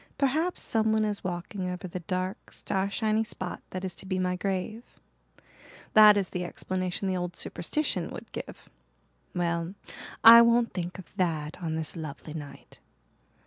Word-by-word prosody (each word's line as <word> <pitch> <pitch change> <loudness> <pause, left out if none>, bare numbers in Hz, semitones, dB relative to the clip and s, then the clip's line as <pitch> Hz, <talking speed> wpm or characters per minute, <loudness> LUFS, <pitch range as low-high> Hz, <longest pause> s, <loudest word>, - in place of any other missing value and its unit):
Perhaps 310 +6 0
someone 220 -1 +2
is 210 -1 -2
walking 180 +1 -4
over 180 +1 -5
the 180 +1 -5
dark, 185 +2 -4
starshiny 215 +3 0
spot 185 -4 -5
that 185 0 -5
is 185 - -4
to 190 - -10
be 185 -1 -1
my 180 0 0
grave. 195 +5 -4 0.9
That 210 -1 +9
is 195 -2 0
the 180 - -2
explanation 185 +1 -3
the 190 - 0
old 180 -1 -3
superstition 185 - -1
would - - -9
give. - - -8 0.7
Well, 170 +1 -1 0.5
I 230 +1 +12
won't 235 0 +3
think 180 0 -4
of 190 - -9
that 160 -3 -1
on 160 -2 -2
this 160 +1 -1
lovely 155 -1 -7
night. 150 -3 -10
185 Hz, 150 wpm, -28 LUFS, 175-215 Hz, 0.9 s, I